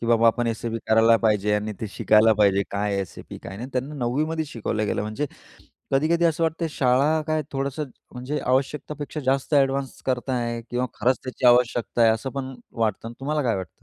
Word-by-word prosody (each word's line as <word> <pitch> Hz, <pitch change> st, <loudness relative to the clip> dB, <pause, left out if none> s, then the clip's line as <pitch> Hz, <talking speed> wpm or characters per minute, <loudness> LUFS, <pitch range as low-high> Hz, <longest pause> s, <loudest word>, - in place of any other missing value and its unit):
की, 115 Hz, -, -4 dB
"बाबा, 115 Hz, 0 st, +4 dB
आपण 120 Hz, +1 st, +3 dB
SAP 115 Hz, 0 st, -2 dB
करायला 115 Hz, +1 st, +6 dB
पाहिजे." 105 Hz, -2 st, +2 dB
आणि 105 Hz, +1 st, -1 dB
ते 110 Hz, -, -2 dB
शिकायला 110 Hz, +2 st, +4 dB
पाहिजे, 100 Hz, -1 st, +4 dB
काय 100 Hz, 0 st, -1 dB
SAP 95 Hz, -, -8 dB
काय -, -, -10 dB
नाही. 95 Hz, +2 st, -8 dB
आणि 130 Hz, -, -6 dB
त्यांना 130 Hz, +4 st, -3 dB
9वी 130 Hz, +2 st, 0 dB
मध्ये 160 Hz, 0 st, -2 dB
शिकवलं 110 Hz, -5 st, -3 dB
गेलं. -, -, -1 dB
म्हणजे 110 Hz, +8 st, -3 dB, 0.7 s
कधी-कधी 160 Hz, +5 st, +2 dB
असं 165 Hz, 0 st, +1 dB
वाटतंय, 165 Hz, +1 st, 0 dB
शाळा 140 Hz, +4 st, +2 dB
काय, 155 Hz, 0 st, +1 dB
थोडंसं 140 Hz, +2 st, -2 dB, 0.3 s
म्हणजे 130 Hz, +4 st, -3 dB
आवश्यकतापेक्षा 145 Hz, +3 st, -1 dB
जास्त 135 Hz, +3 st, 0 dB
एडवान्स 135 Hz, -1 st, +1 dB
करताय 125 Hz, -2 st, -1 dB
किंवा 125 Hz, +1 st, 0 dB
खरंच 125 Hz, +4 st, +1 dB
त्याची 130 Hz, 0 st, -3 dB
आवश्यकता 120 Hz, -1 st, +3 dB
आहे, 115 Hz, -1 st, +6 dB
असं 115 Hz, +4 st, -2 dB
पण 135 Hz, -1 st, -4 dB, 0.2 s
वाटतं. 110 Hz, 0 st, 0 dB
आणि 115 Hz, -, -9 dB
तुम्हाला 150 Hz, +3 st, -1 dB
काय 115 Hz, -, +2 dB
वाटतं? 95 Hz, -3 st, -5 dB
125 Hz, 190 wpm, -24 LUFS, 110-140 Hz, 0.7 s, करायला